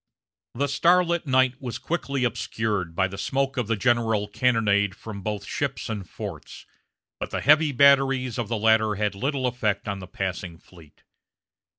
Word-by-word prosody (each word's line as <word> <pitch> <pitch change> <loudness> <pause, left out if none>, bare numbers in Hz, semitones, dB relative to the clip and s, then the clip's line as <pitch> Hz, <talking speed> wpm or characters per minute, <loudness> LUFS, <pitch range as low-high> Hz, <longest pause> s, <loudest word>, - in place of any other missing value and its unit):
The 140 +4 +1
starlit 170 +3 +2
night 130 0 +2
was 125 -3 -4
quickly 140 -6 -2
obscured 105 -6 -2
by 95 +1 +2
the 95 +1 -8
smoke 135 +4 -1
of 125 -4 -1
the 115 - +1
general 110 -2 +1
cannonade 105 -4 +1
from 105 -1 -8
both 105 0 -4
ships 140 0 -3
and 100 -6 -5
forts; - - -8 0.5
but - - -4
the - - -3
heavy 150 +1 +5
batteries 135 -2 +3
of 115 - -2
the 115 +1 -2
latter 110 0 +3
had 105 0 -1
little 130 +5 -2
effect 110 -5 -1
on 100 -1 -3
the 90 - -9
passing 90 -2 -4
fleet. 80 -3 -19
115 Hz, 165 wpm, -25 LUFS, 100-135 Hz, 0.5 s, heavy